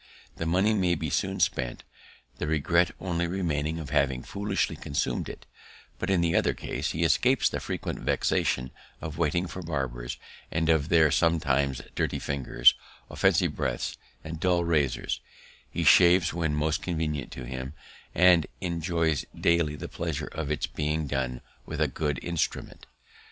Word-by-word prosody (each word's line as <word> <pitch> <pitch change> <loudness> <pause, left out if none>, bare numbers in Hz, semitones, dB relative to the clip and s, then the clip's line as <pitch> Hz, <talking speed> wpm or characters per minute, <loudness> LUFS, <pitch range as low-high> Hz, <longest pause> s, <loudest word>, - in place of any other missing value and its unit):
The 80 - -2
money 95 +6 +3
may 90 -4 +2
be 80 -2 -3
soon - - -1
spent, 60 -2 0 0.6
the - - -2
regret 85 +3 +2
only 85 -2 -1
remaining 80 -4 -1
of 75 -4 -6
having 65 -4 +1
foolishly 100 +1 -1
consumed 70 - -2
it; - - -10 0.5
but 95 - -2
in 95 -3 +3
the 85 -1 +1
other - - +2
case, - - -3
he 80 - -1
escapes 80 - +3
the - - -2
frequent - - -4
vexation 65 0 0 0.3
of 80 0 -6
waiting 85 +2 +1
for 95 +1 -6
barbers, 65 -6 -3 0.3
and 80 0 0
of 80 -1 +3
their 80 -2 +5
sometimes 70 -6 +1
dirty - - -1
fingers, 70 -2 +3 0.4
offensive - - +2
breaths, - - -2 0.3
and 80 0 -6
dull 90 0 +2
razors; 75 -6 0 0.5
he - - -2
shaves 90 -1 +6
when 80 -3 0
most 75 +1 0
convenient 80 -5 -2
to 65 - -7
him, 65 +2 -5 0.4
and 90 -3 +6
enjoys 85 -4 0
daily 85 -3 +2
the 75 - -6
pleasure - - -4
of 75 -2 -4
its 75 -2 0
being 75 +1 -2
done 65 -3 -2 0.3
with 80 - -5
a 80 - +3
good 75 +1 -2
instrument. 85 -2 -3
80 Hz, 155 wpm, -27 LUFS, 70-85 Hz, 0.6 s, shaves